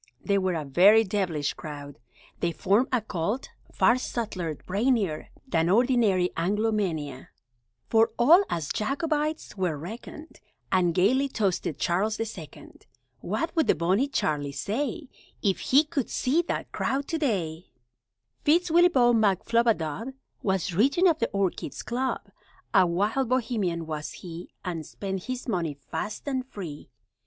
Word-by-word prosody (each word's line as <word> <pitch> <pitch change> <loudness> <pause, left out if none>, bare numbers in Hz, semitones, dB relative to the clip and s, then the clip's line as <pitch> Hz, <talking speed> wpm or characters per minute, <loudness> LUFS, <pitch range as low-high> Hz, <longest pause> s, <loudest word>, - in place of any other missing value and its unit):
They 200 -1 +2
were 185 -2 0
a 155 -2 -3
very 195 +10 +6
devilish 180 -8 -1
crowd! 145 -3 -9 0.4
They 170 - 0
formed 200 +9 +2
a 250 -3 +2
Cult, 205 +4 -3 0.2
far 255 - +3
subtler, 185 -11 -3
brainier, 200 - 0 0.2
Than 165 -7 +1
ordinary 215 -5 +3
Anglomania, 180 - -1 0.6
For 225 0 +4
all 320 +11 +7
as 160 -4 -2
Jacobites 300 +4 -2
were 180 -5 0
reckoned, 230 - -9 0.3
And 175 -3 +2
gaily 260 +10 +3
toasted 190 - -1
Charles 205 +8 0
the 225 - -1
Second! 185 -9 -11 0.3
(What 330 0 -3
would 320 - +2
the - - +4
Bonnie 185 - +1
Charlie 150 - -1
say, 280 - -3 0.4
If 195 -3 +1
he 280 +4 +4
could 300 -5 -3
see 290 +7 +1
that - - -3
crowd 275 +1 -1
to 325 - -1
day?) 180 - -1 0.8
Fitz 335 +3 +3
Willieboy 320 -8 +5
McFlubadub 225 - +1 0.3
Was 190 -2 0
Regent 275 - +4
of 320 -2 +1
the - - 0
Orchids' 195 -2 -2
Club; 255 +2 -2 0.5
A 190 -2 +6
wild 210 +9 0
Bohemian 220 -10 0
was 155 -1 -5
he, 175 -1 -9
And 170 -3 -3
spent 190 +3 -5
his 255 0 -5
money 170 - -1
fast 160 - -6
and 260 -2 -1
free. 165 - -8
205 Hz, 140 wpm, -27 LUFS, 170-255 Hz, 0.8 s, all